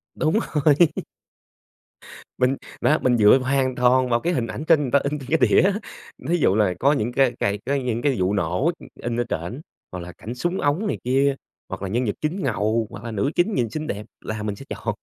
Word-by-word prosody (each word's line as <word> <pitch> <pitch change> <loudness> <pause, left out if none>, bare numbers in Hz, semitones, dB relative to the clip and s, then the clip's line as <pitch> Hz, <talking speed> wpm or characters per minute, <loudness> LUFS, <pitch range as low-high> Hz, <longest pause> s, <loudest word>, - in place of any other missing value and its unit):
Đúng 160 +7 +1
rồi. 150 -9 -2 1.8
Mình, 130 +2 +2 0.3
á, 155 - +3
mình 125 -2 +3
dựa 105 +4 +7
hoàn 130 -1 0
toàn 125 +1 +3
vào 120 0 +2
cái 175 +5 -1
hình 120 -7 -1
ảnh 145 - -5
trên 160 -3 +5
người 130 -4 -3
ta 140 - +5
in 145 +1 -2
trên 130 - -10
cái - - +4
đĩa - - +5
á, 195 +3 +3 0.5
thí 175 - +2
dụ 105 - +2
là 105 -4 +2
có 140 +3 +4
những 120 -3 -1
cái 130 0 +3
cái 100 +1 0
cái 140 0 0
những 120 -1 -1
cái 140 -2 +1
vụ 95 +2 +1
nổ, 100 - +1
ưm, - - -13
in 120 0 -4
ở - - +2
trển, 90 - -4 0.3
hoặc 90 - -5
là 90 0 -8
cảnh 115 +6 -8
súng 175 +7 -2
ống 160 +9 +1
này - - -1
kia, 135 +2 +2 0.3
hoặc 95 - -6
là 100 - -3
nhân 120 +5 0
vật 105 - -1
chính 165 +5 -2
ngầu 110 +1 0
hoặc - - -10
là 115 - -5
nữ 110 +7 -1
chính 190 +5 +2
nhìn 120 - 0
xinh 155 +5 -5
đẹp 105 +1 -4 0.2
là 110 0 -5
mình 105 -1 -3
sẽ 135 - -11
chọn. 110 -2 -3
125 Hz, 240 wpm, -23 LUFS, 110-145 Hz, 1.8 s, dựa